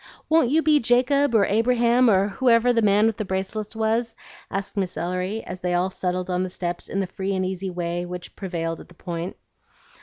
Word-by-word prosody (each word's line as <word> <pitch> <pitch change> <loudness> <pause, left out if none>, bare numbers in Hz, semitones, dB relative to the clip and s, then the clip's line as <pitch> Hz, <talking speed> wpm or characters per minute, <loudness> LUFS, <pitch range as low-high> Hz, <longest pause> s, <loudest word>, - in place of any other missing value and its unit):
Won't 315 -6 +4
you 315 +4 +3
be 305 -1 +4
Jacob 255 +2 +2
or 205 -3 +5
Abraham 240 +2 +3
or 195 0 +3
whoever 245 +2 +3
the 230 - +2
man 205 0 +4
with 225 -2 +1
the - - -2
bracelets 200 +3 -4
was?" 225 +1 0 0.3
asked 195 +2 -4
Miss 190 -3 -2
Ellery, 185 +5 -2
as 180 0 -8
they 180 -1 0
all 180 +2 +1
settled 180 -1 -2
on 180 -1 -1
the 185 - -2
steps 175 -1 -4
in 195 - -2
the 195 - 0
free 190 +1 -3
and 185 0 0
easy 190 +1 -3
way 175 0 -3
which 180 0 -8
prevailed 165 -4 -3
at - - -12
the 175 - -18
Point. 170 +1 -5
195 Hz, 210 wpm, -24 LUFS, 180-230 Hz, 0.3 s, or